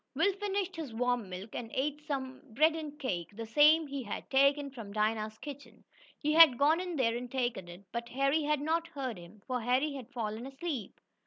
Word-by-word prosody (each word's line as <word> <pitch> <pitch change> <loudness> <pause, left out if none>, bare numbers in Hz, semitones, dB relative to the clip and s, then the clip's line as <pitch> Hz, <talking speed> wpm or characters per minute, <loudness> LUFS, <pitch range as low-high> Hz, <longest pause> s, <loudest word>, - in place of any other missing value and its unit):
Will 400 - +3
finished 390 -1 -2
his 285 -8 -6
warm 245 -3 0
milk, 185 +4 -7
and 230 -2 -5
ate 295 +2 -1
some 270 -4 -4
bread 315 +3 +5
and 300 -2 -6
cake 185 - -3
the 230 +1 -5
same 300 +7 +5
he 280 -1 -4
had 210 -5 -6
taken 275 +1 +3
from 230 -6 -9
Dinah's 215 +1 -1
kitchen. 285 +1 -10 0.3
He 300 0 0
had 315 -6 +8
gone 300 +5 +4
in 360 -2 -4
there 235 -5 +2
and 245 +1 -5
taken 240 -8 -1
it, 175 +3 -11
but 235 +1 -4
Harry 275 +5 +2
had 300 -1 0
not 330 +2 0
heard 265 - -5
him, 185 +4 -14
for 250 -1 -2
Harry 255 +5 +1
had 260 -2 -8
fallen 230 -1 -4
asleep. 275 -3 -5
270 Hz, 200 wpm, -32 LUFS, 230-300 Hz, 0.3 s, had